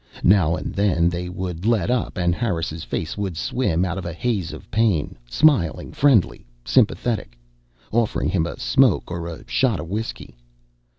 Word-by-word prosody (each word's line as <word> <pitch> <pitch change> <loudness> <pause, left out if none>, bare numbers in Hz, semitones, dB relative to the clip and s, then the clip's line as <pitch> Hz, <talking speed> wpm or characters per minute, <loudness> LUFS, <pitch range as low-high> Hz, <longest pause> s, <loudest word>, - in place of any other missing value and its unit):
Now 90 -4 +4
and - - -5
then 90 -4 +2
they 90 0 -4
would 90 -1 -5
let 115 -3 +2
up 125 -4 -1
and 85 -1 +2
Harris' 85 -6 -2
face 80 - -4
would 95 -5 -3
swim 95 -8 0
out 90 +1 -3
of 90 - -7
a 85 - -4
haze 100 -2 -2
of - - -11
pain, 105 -9 +1
smiling, 105 - +2
friendly, 130 - +2 0.2
sympathetic, 110 - +1 0.5
offering 115 -1 +1
him 85 -4 0
a - - -7
smoke - - +2
or 85 -1 -4
a 85 +7 -9
shot 120 -5 +1
of 80 +2 -7
whiskey. 105 - -5
90 Hz, 165 wpm, -22 LUFS, 85-110 Hz, 0.5 s, Now